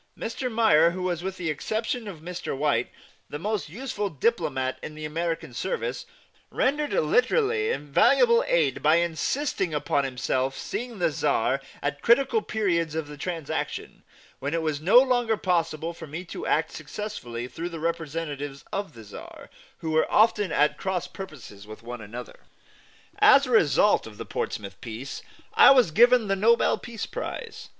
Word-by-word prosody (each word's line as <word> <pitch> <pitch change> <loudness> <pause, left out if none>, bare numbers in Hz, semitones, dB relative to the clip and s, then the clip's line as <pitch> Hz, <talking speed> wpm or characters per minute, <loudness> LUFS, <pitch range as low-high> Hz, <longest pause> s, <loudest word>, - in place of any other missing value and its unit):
Mr. 245 +2 -4
Meyer, 220 -8 +5
who 180 +2 -5
was, 175 -2 -1
with 190 +1 -4
the 170 -3 -2
exception 220 - -3
of 175 -6 -8
Mr. 175 -4 -5
White, 135 -5 +1 0.4
the 145 - -5
most 205 +1 -3
useful 210 - -4
diplomat 145 - -1
in 150 - -7
the 155 0 -6
American 165 -2 -3
service, - - -3 0.4
rendered 295 +3 0
literally 425 - +2
invaluable 470 0 +4
aid - - +1
by 155 +2 +5
insisting 170 - -1
upon 145 -1 0
himself 130 0 -1
seeing 240 -2 -5
the 170 -3 +1
Czar 140 -2 +1 0.2
at 145 0 -2
critical 275 - +3
periods 170 - -1
of 160 -2 -2
the 150 - -9
transaction, 165 0 -4 0.4
when 145 +4 -2
it 165 - -1
was 155 -2 -2
no 195 +9 +5
longer 245 -4 +4
possible 170 -3 -1
for 165 - -10
me 165 +5 -6
to 360 - -6
act - - +1
successfully 125 - -6
through 165 +6 -5
the 165 -2 -7
representatives 155 -4 -4
of 200 0 -3
the 115 - -11
Czar, 105 - -11 0.3
who 160 -2 -3
were 160 0 +2
often 210 -4 +3
at 150 0 +2
cross 185 -2 -2
purposes 140 - -10
with 110 +1 -11
one 120 0 -7
another. 115 +4 -9 0.8
As 280 -10 +7
a 255 - -5
result 205 - +4
of 105 -2 -12
the - - -6
Portsmouth 100 -2 -5
peace, 120 +4 -7 0.3
I - - +8
was 255 -10 +5
given 240 +4 +5
the 195 - +1
Nobel 230 +4 +3
Peace 230 -3 -6
Prize. - - -6
170 Hz, 160 wpm, -26 LUFS, 145-225 Hz, 0.8 s, I